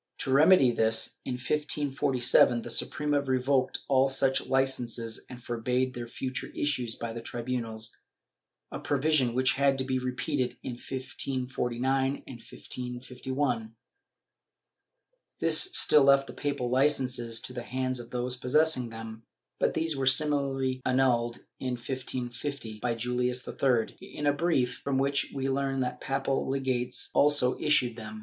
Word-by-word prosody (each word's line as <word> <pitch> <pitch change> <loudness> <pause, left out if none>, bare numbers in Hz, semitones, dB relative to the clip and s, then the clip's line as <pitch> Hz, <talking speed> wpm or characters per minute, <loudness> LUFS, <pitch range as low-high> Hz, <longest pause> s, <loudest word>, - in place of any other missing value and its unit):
To 135 - -2
remedy 145 -2 +6
this, 110 -1 +1
in - - -3
1547, 135 -3 +2
the 120 - -6
Suprema 145 +3 +1
revoked 130 0 0
all 135 0 +3
such 135 0 +1
licences 120 -4 0
and 125 -1 -10
forbade 125 +2 -1
their 120 -1 -6
future 130 +2 -4
issue 145 -4 -1
by 115 -1 -4
the 115 - -6
tribunals, 115 -2 -4 0.8
a - - -5
provision 145 -4 +1
which 130 0 +3
had 140 0 +2
to 130 - 0
be 130 -1 -1
repeated 130 +1 -2
in - - -4
1549 130 +1 -2
and 125 -3 -10
1551.^ 125 -1 -4 1.7
This - - +5
still 150 - +6
left 140 0 +5
the 125 - -10
papal 140 -3 -2
licences 130 -4 +1
in 125 - -8
the 125 - -5
hands 130 +1 -3
of 120 -1 -9
those 125 0 -3
possessing 130 0 +1
them, 115 0 -8 0.4
but - - +1
these 160 -1 0
were 135 -1 -1
similarly 135 -2 +2
annulled, 125 -2 +1 0.2
in 130 -1 -2
1550, 125 -1 -5
by 120 +1 -1
Julius 125 +2 -1
III, 125 -5 0
in 150 - -7
a 145 - +4
brief, 140 -6 0
from 140 -1 0
which 140 +1 +1
we 135 -1 -3
learn 135 0 -1
that 125 0 -3
papal 135 0 -1
legates 130 -2 -1
also 145 -3 +4
issued 125 -6 +2
them. 110 -1 -8
130 Hz, 140 wpm, -28 LUFS, 120-135 Hz, 1.7 s, remedy